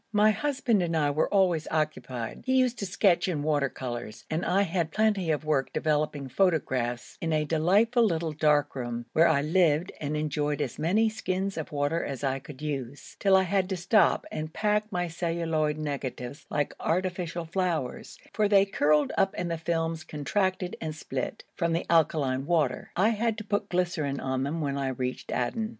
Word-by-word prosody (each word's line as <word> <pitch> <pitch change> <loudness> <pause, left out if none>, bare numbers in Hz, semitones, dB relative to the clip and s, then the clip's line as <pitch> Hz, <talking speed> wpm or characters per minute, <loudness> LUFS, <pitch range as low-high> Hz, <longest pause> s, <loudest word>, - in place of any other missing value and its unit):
My 210 +1 +5
husband 235 -2 +1
and 170 -2 0
I 145 -2 +2
were 150 - 0
always 180 -6 +2
occupied. 140 -7 -3
He 260 - +3
used 250 -2 +2
to 200 - -2
sketch 190 -2 +3
in 155 -6 -1
water 145 -3 +1
colours, 120 -4 -6
and 160 +3 0
I 195 +2 +2
had 170 -3 -1
plenty 205 -2 +1
of 155 -1 0
work 145 -3 +1
developing 150 -2 0
photographs 130 -7 0
in 165 - -1
a 155 -1 +1
delightful 195 - +3
little 165 -6 0
dark 150 -1 +2
room, 120 -2 -4
where 165 +2 +5
I 140 -3 +3
lived 165 +1 +2
and 150 0 -2
enjoyed 150 -1 -1
as 140 -5 -3
many 200 +8 +3
skins 195 -3 -2
of 160 0 -5
water 145 +3 0
as 135 -1 -5
I 135 -1 0
could 140 +1 -11
use, 140 -3 -5
till 195 -1 +4
I 190 - +4
had 190 0 0
to 190 - -1
stop 190 +2 +3
and 155 0 -4
pack 210 +3 0
my 175 -2 -1
celluloid 165 -2 -1
negatives 140 -2 -5
like 145 -1 -1
artificial 175 -1 -1
flowers, 170 -5 -2 0.2
for 215 -1 +2
they 200 -1 +5
curled 150 -6 +2
up 195 0 +2
and 175 -1 -2
the 165 - -1
films 165 -1 -1
contracted 180 +5 -1
and 155 -1 -4
split, 135 -5 -4
from 170 0 0
the 165 - -1
alkaline 145 -5 +2
water. 155 -7 +1
I 195 +5 +4
had 225 0 0
to 215 - -5
put 205 0 -2
glycerine 175 -6 -1
on 130 0 -2
them 150 +4 -2
when 140 -1 -1
I 135 - -1
reached 130 -1 -3
Aden. 215 - -1
160 Hz, 185 wpm, -28 LUFS, 145-190 Hz, 0.2 s, My